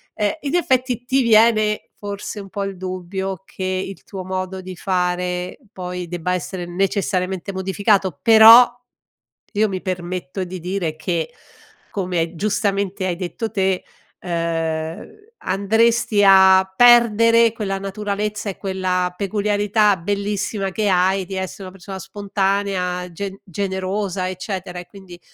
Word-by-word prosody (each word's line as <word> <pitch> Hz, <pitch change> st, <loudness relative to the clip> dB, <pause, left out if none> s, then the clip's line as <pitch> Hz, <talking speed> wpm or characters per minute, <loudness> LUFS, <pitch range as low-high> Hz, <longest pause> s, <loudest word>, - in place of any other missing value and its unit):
ehm, 210 Hz, -1 st, +1 dB
in 290 Hz, +2 st, -3 dB
effetti 255 Hz, -7 st, 0 dB
ti 265 Hz, +1 st, +2 dB
viene 215 Hz, -2 st, +3 dB
forse 205 Hz, +1 st, -5 dB
un 195 Hz, -, -11 dB
po' 200 Hz, 0 st, -4 dB
il 195 Hz, -, -5 dB
dubbio 185 Hz, +1 st, -5 dB
che 190 Hz, -, -8 dB
il 185 Hz, +1 st, -3 dB
tuo 190 Hz, -2 st, -8 dB
modo 185 Hz, 0 st, -4 dB
di 185 Hz, 0 st, -8 dB
fare 180 Hz, -1 st, -2 dB
poi 180 Hz, -1 st, -6 dB
debba 175 Hz, +1 st, -2 dB
essere 175 Hz, +1 st, -4 dB
necessariamente 190 Hz, 0 st, -1 dB
modificato. 190 Hz, -3 st, 0 dB
Però, 225 Hz, +2 st, +9 dB, 0.8 s
io 215 Hz, +1 st, +2 dB
mi 190 Hz, -1 st, -4 dB
permetto 180 Hz, -2 st, -4 dB
di 180 Hz, 0 st, -7 dB
dire 180 Hz, -2 st, -3 dB
che, 170 Hz, +5 st, -2 dB, 0.6 s
come 180 Hz, -3 st, -2 dB
giustamente 200 Hz, 0 st, -1 dB
hai 175 Hz, -, -1 dB
detto 185 Hz, +5 st, -4 dB
te, 190 Hz, -3 st, 0 dB, 0.4 s
ehm, 165 Hz, -2 st, -3 dB, 0.4 s
andresti 220 Hz, +2 st, +2 dB
a 190 Hz, -1 st, +7 dB
perdere 230 Hz, 0 st, +6 dB
quella 200 Hz, -4 st, -3 dB
naturalezza 205 Hz, +1 st, -3 dB
e 195 Hz, -, -5 dB
quella 185 Hz, -2 st, -1 dB
peculiarità 205 Hz, +1 st, +1 dB
bellissima 200 Hz, +1 st, -2 dB
che 210 Hz, +2 st, -1 dB
hai 190 Hz, +1 st, +2 dB
di 190 Hz, +1 st, -7 dB
essere 190 Hz, +1 st, -5 dB
una 185 Hz, -, -8 dB
persona 190 Hz, +1 st, -8 dB
spontanea, 195 Hz, -2 st, -2 dB
gen 195 Hz, +3 st, -6 dB
generosa, 190 Hz, 0 st, -3 dB
eccetera, 185 Hz, -1 st, -5 dB
e 175 Hz, -, -9 dB
quindi 185 Hz, -2 st, -13 dB
190 Hz, 130 wpm, -20 LUFS, 180-205 Hz, 0.8 s, Però